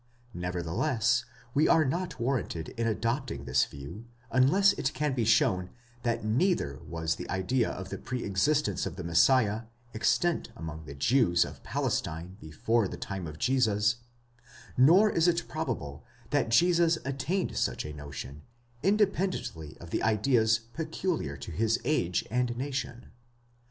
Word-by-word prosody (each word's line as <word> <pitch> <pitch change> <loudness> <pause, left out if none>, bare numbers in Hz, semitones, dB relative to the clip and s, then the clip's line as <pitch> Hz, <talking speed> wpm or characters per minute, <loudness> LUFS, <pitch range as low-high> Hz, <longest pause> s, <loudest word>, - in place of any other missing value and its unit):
Nevertheless, 95 - 0 0.3
we 150 +3 +3
are 160 - +5
not 170 +1 -2
warranted 115 -10 -2
in 115 0 -2
adopting 115 - -2
this 65 0 +3
view, 70 +11 -9 0.3
unless 185 +11 +5
it 135 - -2
can 150 -2 0
be 120 -3 0
shown 90 -4 +3 0.3
that 115 -2 -1
neither 110 - +1
was 80 -1 -1
the - - -8
idea 110 +6 0
of 95 -1 -6
the - - -5
pre 125 -2 -4
existence 105 - +1
of - - -6
the - - -6
Messiah 105 +6 +3 0.3
extant 165 +10 +1
among 80 -4 -7
the 70 - -9
Jews 90 - +3
of - - -10
Palestine 85 +4 -2
before 105 +8 0
the - - -7
time 95 -4 -5
of 75 0 -8
Jesus, 110 -2 +2 0.8
nor 170 +12 +6
is 170 -4 +2
it 175 0 +1
probable 80 - -4 0.3
that - - +1
Jesus 170 +6 +4
attained 140 +8 -2
such - - -1
a 75 - -6
notion, 70 -1 -8 0.4
independently 190 - 0
of 85 0 -11
the - - 0
ideas 110 +1 +3 0.2
peculiar 160 - -2
to 70 +5 -8
his 110 +6 +1
age 90 - +1
and 125 0 0
nation. 130 -2 -4
115 Hz, 145 wpm, -29 LUFS, 85-140 Hz, 0.8 s, nor